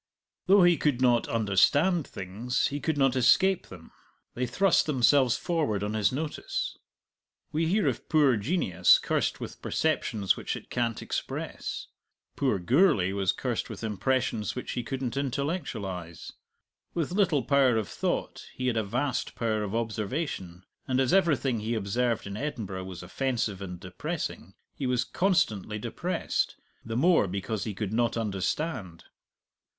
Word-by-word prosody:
Though 195 Hz, 0 st, +7 dB
he 175 Hz, -1 st, +5 dB
could 145 Hz, -5 st, +1 dB
not 120 Hz, -2 st, +3 dB
understand 115 Hz, -, +3 dB
things, 105 Hz, +7 st, -2 dB
he 145 Hz, -, -3 dB
could 160 Hz, 0 st, -1 dB
not 135 Hz, -2 st, +3 dB
escape 185 Hz, +10 st, +4 dB
them; 85 Hz, -3 st, -12 dB, 0.4 s
they 125 Hz, +1 st, -2 dB
thrust 190 Hz, +10 st, +3 dB
themselves 130 Hz, -2 st, +4 dB
forward 150 Hz, -, -1 dB
on 105 Hz, +1 st, -2 dB
his 105 Hz, -2 st, +2 dB
notice. 150 Hz, +3 st, -3 dB, 0.8 s
We 160 Hz, +2 st, 0 dB
hear 200 Hz, +5 st, +2 dB
of -, -, -2 dB
poor 145 Hz, -6 st, +4 dB
genius 100 Hz, -, +4 dB
cursed -, -, -1 dB
with -, -, -8 dB
perceptions 100 Hz, -4 st, 0 dB
which -, -, -3 dB
it -, -, -10 dB
can't 115 Hz, -2 st, -1 dB
express; -, -, -4 dB, 0.5 s
poor 130 Hz, -7 st, +1 dB
Gourlay 120 Hz, -, +3 dB
was 95 Hz, -1 st, +1 dB
cursed -, -, -3 dB
with -, -, -8 dB
impressions 110 Hz, 0 st, -1 dB
which 125 Hz, -, -5 dB
he 125 Hz, -, -2 dB
couldn't 130 Hz, +1 st, -4 dB
intellectualize. 120 Hz, -, -3 dB, 0.6 s
With 165 Hz, -3 st, -1 dB
little 180 Hz, -8 st, +2 dB
power 135 Hz, -4 st, +4 dB
of 110 Hz, -4 st, -1 dB
thought, -, -, -3 dB
he 130 Hz, -, -3 dB
had 125 Hz, -3 st, +1 dB
a 110 Hz, -, +2 dB
vast 125 Hz, +6 st, -2 dB
power 110 Hz, -2 st, 0 dB
of 105 Hz, +1 st, -3 dB
observation; 110 Hz, -, -3 dB, 0.2 s
and 130 Hz, 0 st, +1 dB
as 130 Hz, +3 st, +2 dB
everything 145 Hz, -, +2 dB
he 110 Hz, +2 st, -2 dB
observed 115 Hz, +3 st, 0 dB
in 100 Hz, 0 st, -6 dB
Edinburgh 105 Hz, -8 st, -4 dB
was 90 Hz, -1 st, -8 dB
offensive 115 Hz, -1 st, -2 dB
and 90 Hz, -2 st, -6 dB
depressing, 90 Hz, 0 st, -5 dB, 0.2 s
he 135 Hz, -, -3 dB
was 125 Hz, -1 st, +1 dB
constantly 110 Hz, -, 0 dB
depressed 105 Hz, -, -2 dB, 0.3 s
the 115 Hz, 0 st, -4 dB
more 165 Hz, -, +4 dB
because 100 Hz, +3 st, -3 dB
he 105 Hz, -3 st, -4 dB
could 105 Hz, 0 st, -3 dB
not 120 Hz, 0 st, +1 dB
understand. 100 Hz, -, -2 dB
120 Hz, 150 wpm, -28 LUFS, 100-145 Hz, 0.8 s, Though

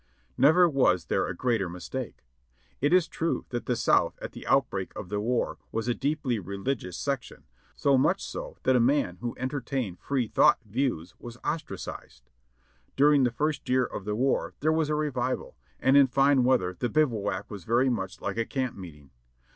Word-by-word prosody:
Never 175 Hz, +6 st, +6 dB
was 130 Hz, -, +2 dB
there -, -, 0 dB
a 90 Hz, -, -4 dB
greater 115 Hz, -5 st, 0 dB
mistake. 90 Hz, -, -7 dB, 0.5 s
It 145 Hz, +3 st, +1 dB
is 180 Hz, -2 st, +4 dB
true 165 Hz, 0 st, -2 dB
that 120 Hz, -2 st, -4 dB
the 125 Hz, -, +1 dB
South 115 Hz, -, +2 dB
at -, -, -6 dB
tlie -, -, -10 dB
outbreak -, -, +1 dB
of 90 Hz, -, -7 dB
the 105 Hz, 0 st, -1 dB
war 120 Hz, +3 st, -1 dB
was 115 Hz, +1 st, -2 dB
a 120 Hz, -, +2 dB
deeply 140 Hz, -3 st, -1 dB
religious 100 Hz, 0 st, -4 dB
section; 140 Hz, -4 st, -4 dB, 0.3 s
so 140 Hz, -2 st, +3 dB
much 175 Hz, +8 st, +1 dB
so -, -, -7 dB
that 130 Hz, -, +3 dB
a -, -, +5 dB
man 120 Hz, -7 st, +2 dB
who 120 Hz, +2 st, -5 dB
entertained 130 Hz, -6 st, -3 dB
"free 130 Hz, -4 st, -1 dB
thought" -, -, +5 dB
views 105 Hz, -, -2 dB
was 120 Hz, 0 st, -9 dB
ostracised. 65 Hz, -, -6 dB, 0.6 s
During 145 Hz, -1 st, +5 dB
the -, -, +3 dB
first 150 Hz, +5 st, -2 dB
year 130 Hz, 0 st, +3 dB
of 100 Hz, -, -7 dB
the 105 Hz, 0 st, -2 dB
war 130 Hz, +4 st, 0 dB
there 155 Hz, +2 st, +3 dB
was 160 Hz, -1 st, +1 dB
a 150 Hz, -, +1 dB
revival, 130 Hz, -4 st, -2 dB, 0.2 s
and 130 Hz, -, +3 dB
in 140 Hz, -1 st, +7 dB
fine 135 Hz, 0 st, +3 dB
weather 120 Hz, -8 st, +2 dB
the 120 Hz, -, 0 dB
bivouac 115 Hz, -8 st, 0 dB
was 100 Hz, -4 st, -7 dB
very 125 Hz, +5 st, +2 dB
much 95 Hz, -5 st, -4 dB
like 100 Hz, +1 st, -3 dB
a 115 Hz, -, 0 dB
camp 130 Hz, -3 st, -2 dB
meeting. 75 Hz, -7 st, -11 dB
125 Hz, 185 wpm, -27 LUFS, 105-140 Hz, 0.6 s, in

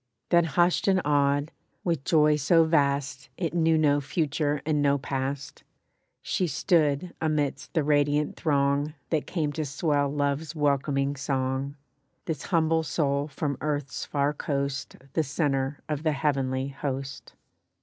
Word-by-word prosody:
Then 170 Hz, -1 st, +4 dB
hushed 175 Hz, +5 st, +2 dB
and 190 Hz, -1 st, +4 dB
awed, 145 Hz, 0 st, +2 dB, 0.3 s
with 165 Hz, -6 st, -1 dB
joy 150 Hz, -2 st, +4 dB
so 165 Hz, +4 st, +4 dB
vast 140 Hz, -4 st, 0 dB
It 170 Hz, -3 st, -2 dB
knew 165 Hz, -2 st, +3 dB
no 145 Hz, -2 st, +3 dB
future 145 Hz, 0 st, -1 dB
and 150 Hz, -2 st, +1 dB
no 140 Hz, 0 st, +3 dB
past, 135 Hz, 0 st, -4 dB, 0.6 s
She 185 Hz, -, 0 dB
stood 155 Hz, +1 st, +1 dB
amidst 150 Hz, -3 st, -1 dB
the 160 Hz, -, +3 dB
radiant 145 Hz, 0 st, +2 dB
throng 145 Hz, 0 st, +1 dB, 0.2 s
That 155 Hz, -3 st, 0 dB
came 155 Hz, -5 st, -1 dB
to 155 Hz, -, -2 dB
swell 145 Hz, 0 st, 0 dB
love's 145 Hz, +2 st, -1 dB
welcoming 140 Hz, -1 st, +1 dB
song— 135 Hz, 0 st, -2 dB, 0.5 s
This 155 Hz, -4 st, -4 dB
humble 165 Hz, -1 st, +2 dB
soul 145 Hz, -2 st, 0 dB
from 140 Hz, -2 st, -3 dB
earth's 145 Hz, -3 st, -2 dB
far 145 Hz, 0 st, 0 dB
coast 140 Hz, -1 st, -3 dB, 0.2 s
The 160 Hz, -, +2 dB
center 140 Hz, -2 st, -1 dB
of 150 Hz, -2 st, -2 dB
the 155 Hz, -1 st, +1 dB
heavenly 135 Hz, -2 st, 0 dB
host. 135 Hz, -1 st, -5 dB
145 Hz, 140 wpm, -27 LUFS, 140-155 Hz, 0.6 s, Then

